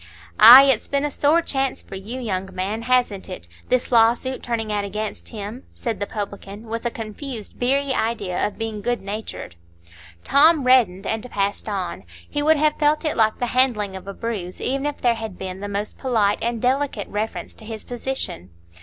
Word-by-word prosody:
"Ay, 255 +4 +12
it's 270 -5 +2
been 280 +1 0
a 295 - -2
sore 305 +5 +3
chance 270 -4 -1
for - - -13
you, 210 +7 -6
young 195 -6 -3
man, 200 +5 -2
hasn't 240 -6 0
it,—this 180 - -3
lawsuit 240 +3 +3
turning 225 -3 -2
out 205 -1 0
against 210 +1 -5
him?" 215 +3 -7
said 230 -3 -3
the 205 - -2
publican, 205 0 -6
with 230 +1 -3
a - - 0
confused, 225 +1 -7
beery 275 +2 +1
idea 215 -7 -1
of 210 - -10
being 225 -2 -4
good 245 +2 -1
natured. 200 - -6 0.7
Tom 300 +1 +5
reddened 240 -8 +4
and 225 +3 -3
passed 200 +1 -2
on; 185 - -4 0.2
he 290 - -2
would 310 +1 +4
have 300 0 +1
felt 300 +2 +2
it 305 - 0
like 220 -1 +2
the 245 - -1
handling 225 -7 +2
of 190 0 -9
a 200 - -5
bruise, 205 -6 -5
even 275 +2 -1
if 295 - -4
there 240 -1 +3
had 220 -4 -7
been 190 0 -6
the 205 - -5
most 205 +1 -4
polite 220 -6 +1
and 235 0 -2
delicate 260 -4 0
reference 215 +2 -4
to - - -15
his 220 -1 -7
position. 245 - -5
225 Hz, 190 wpm, -22 LUFS, 205-260 Hz, 0.7 s, Ay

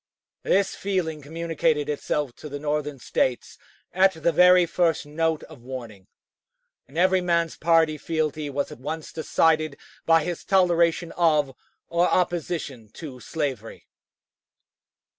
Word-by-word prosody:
This 195 0 +1
feeling 180 -6 -2
communicated 160 -1 -1
itself 145 -2 -2
to 150 - -9
the 145 - -5
Northern 150 -1 -2
States 125 0 -2 0.3
at 190 +1 +4
the 160 0 0
very 180 +1 +6
first 165 -3 0
note 160 +1 -1
of 150 -6 -13
warning, 115 -6 -9 0.8
and 140 - -12
every 185 +1 +3
man's 170 -2 0
party 160 -2 +2
fealty 155 -2 -2
was 140 0 -3
at - - -10
once 155 +4 -6
decided 155 -2 +1 0.3
by 165 -1 +5
his 175 0 -4
toleration 170 -3 +2
of 150 -5 +2 0.3
or 170 +1 +2
opposition 165 -9 -2
to 140 -6 -9
slavery. 135 -7 -4
160 Hz, 125 wpm, -25 LUFS, 145-170 Hz, 0.8 s, very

